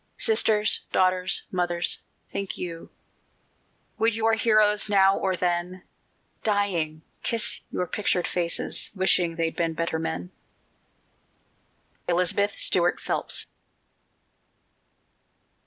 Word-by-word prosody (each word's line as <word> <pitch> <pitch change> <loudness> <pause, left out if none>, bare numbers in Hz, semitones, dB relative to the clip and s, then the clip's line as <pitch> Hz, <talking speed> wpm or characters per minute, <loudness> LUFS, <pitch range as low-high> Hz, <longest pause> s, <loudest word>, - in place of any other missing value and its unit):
Sisters, 330 - +3
daughters, 185 0 +2
mothers, 175 -1 0 0.3
think 195 -1 -4
you, 170 -2 -7 1.1
Would 225 0 +2
your 225 0 +2
heroes 215 -2 +3
now 195 -1 +5
or 190 -1 -1
then, 180 +1 -2 0.6
Dying, 175 -7 -1 0.2
kiss 230 -1 +1
your 180 - -2
pictured 180 -1 -1
faces, 170 -2 -2
Wishing 185 -3 +2
they'd 165 -1 -2
been 165 -1 -1
better 165 0 -2
men? 90 - -4 1.8
ELIZABETH 180 +4 +1
STUART 175 -1 +3
PHELPS. - - 0
185 Hz, 90 wpm, -25 LUFS, 170-210 Hz, 1.8 s, now